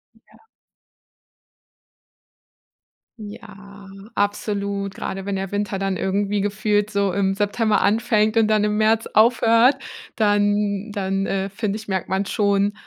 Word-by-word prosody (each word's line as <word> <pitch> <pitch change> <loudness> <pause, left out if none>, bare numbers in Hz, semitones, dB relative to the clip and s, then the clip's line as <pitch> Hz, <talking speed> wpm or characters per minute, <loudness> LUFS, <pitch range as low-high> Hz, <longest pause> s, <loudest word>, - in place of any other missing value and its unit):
Hm - - -27
ja. 445 - -23 2.7
Ja, 205 -2 -12 0.3
absolut. 200 -1 -2
Grade 190 0 -5
wenn 200 -1 -2
der 195 -1 -4
Winter 205 -1 -2
dann 195 -1 -1
irgendwie 200 +2 -1
gefühlt 205 0 0
so 200 -3 0
im 195 -1 +1
September 210 +2 0
anfängt 215 +1 +2
und 220 -1 +3
dann 215 -1 +2
im 210 0 0
März 220 +1 +2
aufhört, 230 +3 +4 0.4
dann 205 -1 +1
dann, 195 -1 -2
äh, 195 0 -2
finde 205 +1 -3
ich, 220 - -11
merkt 190 -3 -3
man 190 +1 0
schon, 200 0 +1
205 Hz, 130 wpm, -21 LUFS, 195-215 Hz, 2.7 s, aufhört